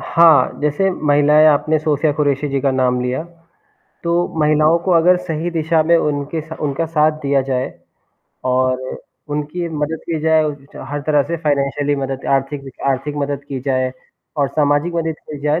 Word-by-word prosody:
हाँ, 160 -6 +4
जैसे 150 +6 +1
महिलाएँ 150 -2 +4
आपने 155 +1 +2
सोफिया 150 -1 +1
कुरैशी 145 -1 0
जी 135 -1 -1
का 135 0 +1
नाम 130 -1 +1
लिया। 125 +4 -2 0.8
तो 170 - 0 0.3
महिलाओं 155 +2 +3
को 190 - 0
अगर 175 +2 +5
सही 165 +1 -2
दिशा 160 -1 +1
में 170 +2 +4
उनके 150 0 -1
स - - -9
उनका 150 +3 -1
साथ 155 -1 +2
दिया 140 -1 +2
जाए 130 -1 -2 0.8
और 130 0 +1 0.5
उनकी 150 +4 -3
मदद 155 0 -3
की 160 -2 -1
जाए 160 0 +3
उच 150 -1 -3
च - - -13
हर 145 0 -3
तरह 150 -2 +3
से 170 - -1
फाइनेंशियली 145 0 0
मदद 135 -1 -4
आर्थिक 135 +1 -2
वि 135 - -8 0.2
आर्थिक 135 +2 -2
मदद 140 0 -3
की 135 -2 -4
जाए 130 -1 -1 0.4
और 140 -2 +1
सामाजिक 145 +3 +1
मदद 165 -1 -1 0.2
की 150 - -6
जाए, 150 +2 +1
150 Hz, 175 wpm, -18 LUFS, 140-160 Hz, 0.8 s, अगर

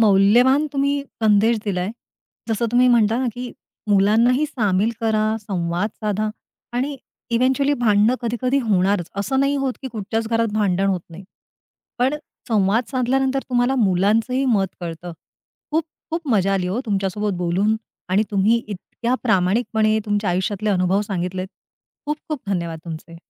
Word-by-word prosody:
मौल्यवान 230 +8 +5
तुम्ही 280 0 0 0.2
संदेश 220 +2 +4
दिला 195 -4 -1
आहे. 185 +3 -2 0.6
जसं 225 +1 0
तुम्ही 250 +1 +5
म्हणता 230 -2 +3
ना 260 - 0
की 245 0 -6 0.4
मुलांनाही 225 +8 +4
सामील 210 -5 +1
करा, 220 -1 +1
संवाद 180 0 -2
साधा 215 0 -1 0.5
आणि 275 +3 -1 0.3
इव्हेंच्युअली 265 +4 +2
भांडणं 220 -1 +3
कधी-कधी 245 +3 0
होणारच 195 -5 +1
.असं 205 +7 0
नाही 280 +1 +2
होत 270 -2 0
की 265 - -4
कुठच्याच 220 0 -3
घरात 230 -1 +1
भांडण 195 -2 +1
होत 190 -2 0
नाही. 185 +4 -10 0.7
पण 260 +4 +2 0.3
संवाद 215 +2 +2
साधल्यानंतर 265 +1 +1
तुम्हाला 245 +1 +2
मुलांचंही 220 +6 +2
मत 205 -6 +2
कळतं. 170 0 -6 0.6
खूप 315 +1 +1 0.3
खूप 330 -2 -3
मजा 195 -4 +2
आली 185 -2 0
हो 195 +7 -1
तुमच्यासोबत 200 +1 -1
बोलून 185 +5 +1 0.3
आणि 190 +3 +3
तुम्ही 205 +3 +3
इतक्या 215 +4 -3
प्रामाणिकपणे 215 +1 +2
तुमच्या 205 -2 0
आयुष्यातले 200 +4 -1
अनुभव 185 0 +2
सांगितलेत. 185 -2 -3 0.6
खूप 300 +1 -1
खूप 305 -4 -3
धन्यवाद 170 -4 -2
तुमचे. 165 0 -8
215 Hz, 140 wpm, -21 LUFS, 195-245 Hz, 0.7 s, मौल्यवान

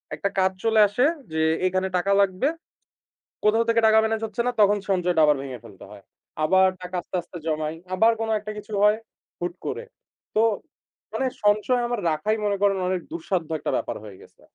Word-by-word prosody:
একটা 200 - -2
কাজ 190 0 +3
চলে 225 -1 +3
আসে 245 +7 +1 0.3
যে, 160 - 0 0.3
এখানে 185 +1 0
টাকা 195 +3 0
লাগবে। 195 +6 +1 1.0
কোথাও 225 +2 +3
থেকে 230 0 +3
টাকা 220 0 +6
মেনেজ 220 0 0
হচ্ছে 220 +2 -3
না, - - +2
তখন 205 0 +5
সঞ্চয়টা 180 -3 +2
আবার 150 -2 +3
ভেঙে 130 -3 -7
ফেলতে 105 -4 -14
হয়। 100 -2 -13 0.4
আবার 190 +4 +5
টাকা 180 0 -6
আস্তে, 175 - -8
আস্তে 175 +1 -11
জমাই। 155 0 -1 0.2
আবার 225 +5 +5
কোন 225 - -2
একটা 210 +1 -7
কিছু 210 +1 -10
হয় 210 +1 +5 0.4
হুট 175 0 -2
করে। - - -3 0.5
তো 215 - +4 0.7
মানে 265 - -1 0.2
সঞ্চয় 215 +4 +3
আমার 240 -1 -2
রাখাই 185 +9 0
মনে 200 -1 +1
করেন 200 -1 +3
অনেক 185 -2 -1
দুঃসাধ্য 195 - -2
একটা - - -2
ব্যাপার - - -3
হয়ে 100 -3 -11
গেছে। - - -19
195 Hz, 185 wpm, -24 LUFS, 175-220 Hz, 1.0 s, টাকা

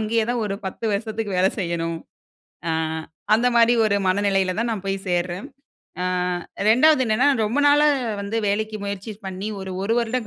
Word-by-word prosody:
அங்கேயே 220 +1 +1
தான் 245 -1 -1
ஒரு 195 - -2
10 190 - -6
வருஷத்துக்கு 215 -1 -3
வேல 185 - +4
செய்யணும். 170 -2 -2 0.7
ஆ, - - +2 0.6
அந்தமாரி 235 0 +4
ஒரு 200 -1 +2
மனநிலையில 195 -1 +1
தான் 235 0 0
நான் 200 -3 -4
போய் 195 0 -1
சேர்றேன். 175 +1 -1 0.6
ஆ - - 0 0.6
2வது 260 +5 +5
என்னன்னா, 235 +6 +3 0.2
ரொம்ப 235 +7 -1
நாளா 295 +1 +5 0.3
வந்து 200 +3 -3
வேலைக்கு 215 +1 -1
முயற்சி 200 +2 -5
பண்ணி 190 +2 -4
ஒரு 190 0 -6
1 225 +3 +1
வருடம் 235 0 -1
215 Hz, 160 wpm, -23 LUFS, 190-230 Hz, 0.7 s, 2வது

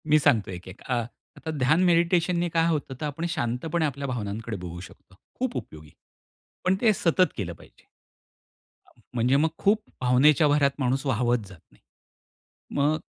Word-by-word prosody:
मी 155 +1 +6
सांगतो 110 -8 +2
एक, 90 0 -8
एक. 95 +3 -11
अ, 130 - -3 0.4
आता 160 - -5
ध्यान, 150 +7 +3
मेडिटेशन 175 0 +3
ने 175 0 0
काय 165 0 +2
होतं, 150 -5 -1
तर - - -1
आपण 150 +3 -3
शांतपणे 155 +4 -1
आपल्या 140 -1 -3
भावनांकडे 115 -2 -4
बघू 90 -1 -7
शकतो. 95 0 -15 0.2
खूप 255 -1 -1
उपयोगी. 75 -1 -9 0.7
पण 185 +1 +3
ते 225 -3 +5
सतत 180 0 +2
केलं - - -3
पाहिजे. - - -18 1.0
अ, - - -24 0.2
म्हणजे 125 +3 +3
मग 155 +3 +3
खूप 210 +2 +2 0.2
भावनेच्या 140 +5 +4
भरात 145 -1 +3
माणूस 135 +1 0
वाहावत 120 -1 +2
जात 95 -2 -13
नाही. - - -25 1.0
मग 145 +2 +3
अ, - - -8
140 Hz, 170 wpm, -26 LUFS, 120-165 Hz, 1.0 s, मी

